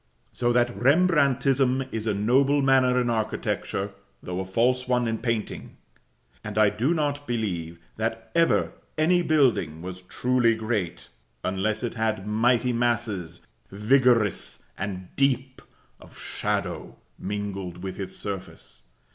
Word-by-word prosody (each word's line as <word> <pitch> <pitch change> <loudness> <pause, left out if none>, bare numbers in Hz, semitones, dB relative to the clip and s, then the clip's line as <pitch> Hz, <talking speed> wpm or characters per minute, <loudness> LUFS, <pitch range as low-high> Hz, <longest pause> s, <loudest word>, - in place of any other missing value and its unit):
So 120 -1 +1
that 120 0 +2
Rembrandtism 135 -3 +3
is 110 0 -3
a 105 - +2
noble 135 +7 +3
manner 130 -2 +4
in 125 - 0
architecture, 110 -3 -2 0.3
though 90 0 -4
a 95 - -3
false 125 +6 +1
one 125 -1 +1
in 115 -1 -1
painting; 115 -3 -3 0.7
and 105 -1 -6
I 105 -1 +5
do 135 +10 +1
not 145 -2 -1
believe 90 -9 -3 0.2
that 115 +1 -3
ever 170 0 +3 0.3
any 175 +3 +3
building 125 - +2
was 90 0 -7
truly 120 +4 +1
great, 110 -6 -3 0.3
unless 100 +4 -1
it 120 - -2
had 110 -3 -1
mighty 120 +3 +2
masses, 110 -8 -1 0.2
vigorous 115 0 +2
and 95 -2 -6
deep, 130 -1 0 0.4
of - - -16
shadow - - -3 0.2
mingled 95 -3 -5
with 95 0 -5
its 95 - -5
surface. 95 -10 -7
115 Hz, 130 wpm, -26 LUFS, 100-130 Hz, 0.7 s, I